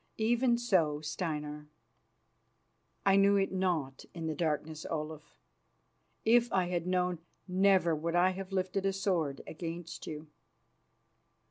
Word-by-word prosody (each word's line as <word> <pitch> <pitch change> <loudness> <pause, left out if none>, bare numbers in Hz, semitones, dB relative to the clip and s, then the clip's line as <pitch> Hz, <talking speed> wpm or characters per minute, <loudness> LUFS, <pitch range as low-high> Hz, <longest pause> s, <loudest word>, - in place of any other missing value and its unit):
"Even 235 +2 +3
so, 175 -11 +2
Steinar." 150 -1 -4 1.4
"I 195 0 +5
knew 200 +1 +5
it 195 0 +1
not 170 -8 -1
in 165 -1 -4
the 160 - -1
darkness, 155 -1 -2
Olaf. 155 -1 -5 0.9
If 235 +1 +4
I 185 -2 +1
had 175 -1 -2
known, 180 -2 +1 0.3
never 185 -2 +4
would 165 +2 -2
I 180 +2 +4
have 190 +1 -7
lifted 195 +1 0
sword 175 -8 -1
against 165 0 -6
you." 155 0 -6
175 Hz, 120 wpm, -32 LUFS, 155-195 Hz, 1.4 s, I